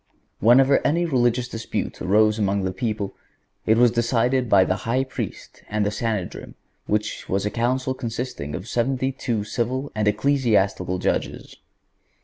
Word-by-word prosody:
Whenever 130 +5 +5
any 170 +4 +1
religious 125 -4 +1
dispute 115 -2 -4
arose 105 +2 +3
among 100 -1 +1
the 95 - -1
people 105 0 -3 0.5
it 110 +1 +4
was 120 -1 +5
decided 120 +1 +1
by 95 -2 +6
the 95 - 0
High 130 +3 +2
Priest 130 - -7
and 105 -1 0
the 105 - 0
Sanhedrim, 105 -4 -4 0.3
which 105 0 -2
was 95 +1 0
a 105 - -1
council 130 +3 0
consisting 115 - -5
of 95 - -7
seventy 130 +3 0
two 120 -5 -2
civil 125 +6 -2
and 105 -1 -1
ecclesiastical 105 -6 +1
judges. - - -2
115 Hz, 145 wpm, -23 LUFS, 105-130 Hz, 0.5 s, by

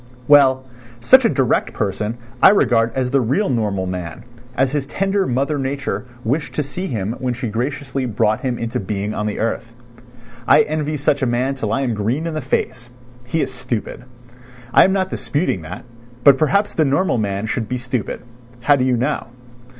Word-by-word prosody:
Well, 130 -3 +5 0.3
such 260 - +6
a - - +5
direct 135 - +1
person 105 +2 -2 0.2
I - - +9
regard 115 - +3
as 130 -1 -1
the 135 -1 +3
real 135 - +1
normal 105 -6 -1
man, 90 +1 -5 0.3
as 135 -1 +2
his 140 -2 -2
tender 195 +4 0
mother 140 +4 0
nature 135 -1 -3 0.2
wished 140 +7 -2
to 150 - 0
see 180 +7 -5
him 110 - -2
when 125 -2 -2
she 125 -1 -4
graciously 135 +3 -3
brought 110 -1 +1
him 125 -2 -2
into 115 0 -3
being 100 +1 -3
on 105 - -2
the 105 - -3
earth. 115 +1 -2 0.8
I - - +7
envy 150 0 -2
such 145 0 +1
a 130 - +1
man 125 +3 0
till 115 -6 -3
I 115 - 0
am 125 -4 0
green 115 +9 -1
in 165 - -3
the 155 - -3
face. 120 -3 -2 0.4
He 150 +6 -1
is 130 -1 -3
stupid. 125 -1 -4 0.7
I - - +7
am 190 - +2
not 190 -1 0
disputing 145 - -1
that, 80 +8 -8 0.4
but 140 -2 +7
perhaps 200 +7 +2
the 160 - +2
normal 140 -1 +1
man 100 0 -2
should 110 0 -3
be 125 - -1
stupid, 125 -2 -4 0.4
how 145 +4 +4
do 130 - +1
you 130 -1 +2
know? 130 +3 -1
130 Hz, 190 wpm, -19 LUFS, 115-145 Hz, 0.8 s, I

